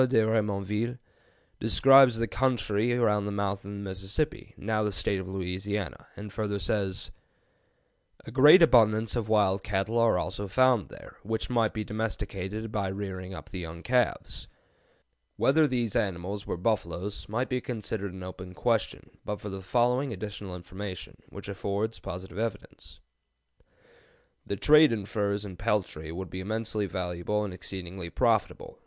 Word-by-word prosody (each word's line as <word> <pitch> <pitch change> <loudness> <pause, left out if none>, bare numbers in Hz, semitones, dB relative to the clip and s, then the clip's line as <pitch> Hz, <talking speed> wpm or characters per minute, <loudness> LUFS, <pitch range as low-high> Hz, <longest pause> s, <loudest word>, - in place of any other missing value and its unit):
de 130 - +1
Remonville, 105 +2 0 0.6
describes 130 +2 +6
the 115 - +1
country 115 -3 +1
around 105 -4 +2
the - - -2
mouth 100 -1 -1
of 100 - -9
the 100 - -6
Mississippi, 100 +9 -3
now 110 +1 -1
the 105 -1 0
State 95 +1 -1
of 95 - -6
Louisiana, 95 +1 -4
and 105 -1 -8
further 105 -2 -1
says: 95 +1 -1 1.1
"A - - -8
great 150 +8 +8
abundance 110 -6 +4
of 115 -3 -2
wild 100 -3 +3
cattle 105 +3 0
are 115 -5 +4
also 95 +4 -3
found 125 +1 +3
there, - - -13
which 110 +3 -3
might 115 -3 +2
be 110 - -3
domesticated 105 0 -4
by 100 -3 -1
rearing 95 -1 -5
up - - -10
the 95 - -5
young 85 0 -7
calves." 125 -2 0 0.9
Whether 155 +3 +4
these 120 -5 -1
animals 95 +1 -2
were - - -2
buffaloes 100 0 -2
might 120 +4 -1
be 125 -1 -1
considered 110 -4 -4
an 95 0 -8
open 90 0 -8
question 115 -2 0 0.2
but 105 0 -4
for 105 - -6
the 95 0 -6
following 125 +6 +1
additional 100 -2 -6
information, 90 +1 -7
which - - -9
affords 100 +3 -2
positive 90 0 -7
evidence: 110 -3 -5 1.5
"The 100 - -1
trade 150 +6 +6
in 105 -4 -2
furs 100 0 -1
and 95 -3 -9
peltry 95 -8 -1
would 90 +1 -6
be 95 - -5
immensely 110 +1 -2
valuable 90 +3 -2
and 100 -3 -4
exceedingly 90 -1 -6
profitable. - - 0
105 Hz, 150 wpm, -28 LUFS, 95-115 Hz, 1.5 s, great